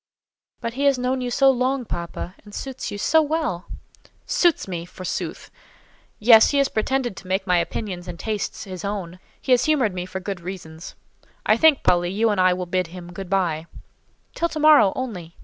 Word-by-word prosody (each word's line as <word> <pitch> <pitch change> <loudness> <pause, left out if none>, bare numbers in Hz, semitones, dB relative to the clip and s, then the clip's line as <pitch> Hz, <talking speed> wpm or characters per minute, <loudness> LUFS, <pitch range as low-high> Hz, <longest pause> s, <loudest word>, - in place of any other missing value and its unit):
"But 230 - -3
he 275 +3 -1
has 280 -2 +4
known 255 +1 -1
you 250 - -2
so 270 +2 +4
long, 255 0 0
papa, 170 -1 -5
and 205 -1 -12
suits 265 -1 -5
you 205 - -5
so 320 +10 +3
well." 300 - -2 0.6
"Suits 345 - +2
me, 175 -3 -4
forsooth! 180 +1 -6 0.7
Yes; 225 0 +7
he 285 - +1
has 275 -1 +3
pretended 240 0 -1
to 185 - -10
make 190 +1 -1
my 180 -2 +3
opinions 180 -1 -4
and 175 -1 -6
tastes 215 +2 -3
his 185 -3 -8
own. 190 -3 -4 0.2
He 260 - -4
has 250 0 +5
humoured 275 -10 +2
me 180 0 -4
for 190 - -5
good 190 -1 -5
reasons. 170 -3 -8 0.5
I - - +5
think, 315 -3 +4
Polly, 175 -1 +3
you 215 +4 +1
and 195 -3 +1
I 185 0 +5
will 180 0 -2
bid 185 0 -1
him 175 +1 -10
good 190 0 -7
by." 170 -5 0 0.7
"Till 335 - -1
to 310 - -5
morrow 300 -10 +6
only. 185 -10 -5
200 Hz, 195 wpm, -23 LUFS, 180-260 Hz, 0.7 s, Yes